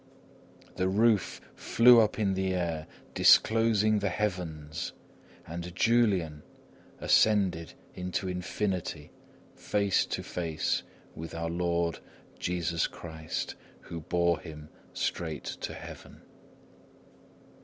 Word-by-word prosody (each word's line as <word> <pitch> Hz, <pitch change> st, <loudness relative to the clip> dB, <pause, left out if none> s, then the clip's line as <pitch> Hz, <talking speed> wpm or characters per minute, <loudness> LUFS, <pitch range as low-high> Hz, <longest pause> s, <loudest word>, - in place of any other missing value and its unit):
The 95 Hz, 0 st, +1 dB
roof 105 Hz, -1 st, +2 dB, 0.2 s
flew 120 Hz, 0 st, +6 dB
up 110 Hz, -1 st, +1 dB
in 100 Hz, -3 st, +1 dB
the 95 Hz, 0 st, 0 dB
air, 85 Hz, -3 st, -2 dB, 0.3 s
disclosing 110 Hz, -1 st, +5 dB
the 100 Hz, -1 st, 0 dB
heavens, 85 Hz, -7 st, -3 dB, 0.5 s
and 85 Hz, +1 st, -6 dB
Julian 95 Hz, -10 st, +2 dB, 0.6 s
ascended 95 Hz, -6 st, +3 dB, 0.2 s
into 90 Hz, +1 st, -3 dB
infinity 90 Hz, -3 st, -3 dB, 0.4 s
face 100 Hz, -2 st, +1 dB
to -, -, -3 dB
face 80 Hz, -3 st, -1 dB, 0.3 s
with 80 Hz, +1 st, -7 dB
our 85 Hz, 0 st, -2 dB
Lord 85 Hz, -1 st, 0 dB, 0.4 s
Jesus 85 Hz, -1 st, 0 dB
Christ, 80 Hz, -2 st, -5 dB, 0.3 s
who 85 Hz, -2 st, -7 dB
bore 85 Hz, +1 st, +1 dB
him 75 Hz, -1 st, -10 dB, 0.2 s
straight 80 Hz, -4 st, -3 dB
to -, -, -5 dB
heaven. -, -, -11 dB
90 Hz, 100 wpm, -29 LUFS, 80-100 Hz, 0.6 s, flew